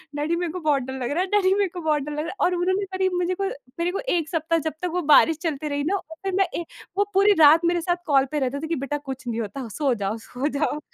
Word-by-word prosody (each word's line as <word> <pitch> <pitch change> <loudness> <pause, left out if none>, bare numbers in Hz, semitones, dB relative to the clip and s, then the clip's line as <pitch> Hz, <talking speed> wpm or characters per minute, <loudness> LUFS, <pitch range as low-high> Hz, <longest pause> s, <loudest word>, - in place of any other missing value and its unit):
"Daddy, 300 +3 0
मेरे 345 -2 -2
को 365 - -5
बहुत 295 -4 +1
डर 265 +1 -6
लग 245 - -2
रहा 335 +5 +1
है, 380 - -1
डैडी, 380 -2 +4
मेरे 400 -2 +1
को - - -4
बहुत 305 -2 +1
डर 300 - -6
लग 300 - -4
रहा 310 - -2
है।" 375 - -6
और 360 - +1
उन्होंने 375 +3 0
करीब 375 -1 +1
मुझे 360 +1 0
को 390 - 0 0.3
मेरे 345 +1 +1
को 390 - -3 0.2
1 320 -1 -2
सप्ताह 330 0 0
जब - - -12
तक 360 - 0
वो 360 - 0
बारिश 325 -2 +5
चलती 305 -2 -2
रही 285 0 -1
ना, - - +2 0.3
फिर 385 - -2
मैं 390 - +3
ए 340 - -5 0.3
वो 405 - +4
पूरी 400 +2 +5
रात 320 +3 +7
मेरे 345 0 +2
साथ 350 0 -1
कॉल 275 -3 +4
पे 300 - 0
रहते 270 +1 -1
थे - - -2
कि, 330 - -1
"बेटा, 275 +1 -3
कुछ 265 -3 -8
नहीं 230 0 -2
होता, 230 +4 -5
सो 275 -4 +2
जाओ, 205 0 -2
सो 255 +3 -2
जाओ।" 300 -1 0
320 Hz, 290 wpm, -24 LUFS, 280-360 Hz, 0.3 s, रात